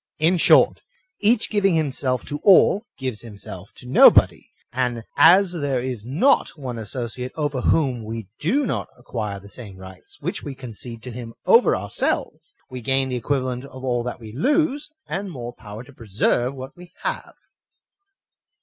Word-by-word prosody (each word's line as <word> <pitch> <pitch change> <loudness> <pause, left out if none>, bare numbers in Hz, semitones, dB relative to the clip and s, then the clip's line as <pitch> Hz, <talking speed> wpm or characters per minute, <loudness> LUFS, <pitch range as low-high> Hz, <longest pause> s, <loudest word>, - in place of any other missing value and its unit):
In 165 +4 +3
short, - - +5 0.4
each 220 +2 +2
giving 195 -4 +2
himself 135 -5 -1
to 145 - -5
all, 200 +4 +5
gives 130 -5 -4
himself 100 -4 -10
to 125 - -12
nobody; 125 - +6 0.3
and 120 -2 -1
as 175 +5 +6
there 145 -7 -1
is 125 -5 -4
not 165 - +2
one 125 -5 -5
associate 120 +3 -5
over 145 -4 -2
whom 130 -7 +1
we 110 -1 -6
do 265 - +1
not - - -2
acquire 110 -5 -5
the 100 - -14
same 100 -3 -10
rights 95 0 -13
which - - -4
we 140 - -7
concede 120 -2 -9
to 125 - -7
him 115 -1 -8
over 465 - +5
ourselves, 410 - -3
we 130 -1 -8
gain 135 +1 0
the 125 - -2
equivalent 130 0 -2
of 130 -1 -11
all 120 -2 0
that 125 0 -5
we 110 -2 -10
lose, 290 - +1 0.2
and 195 +1 -4
more 120 -7 -7
power 105 0 -10
to 140 - -16
preserve 120 +4 0
what 130 0 -9
we 175 0 -14
have. - - -4
130 Hz, 165 wpm, -22 LUFS, 115-155 Hz, 0.4 s, nobody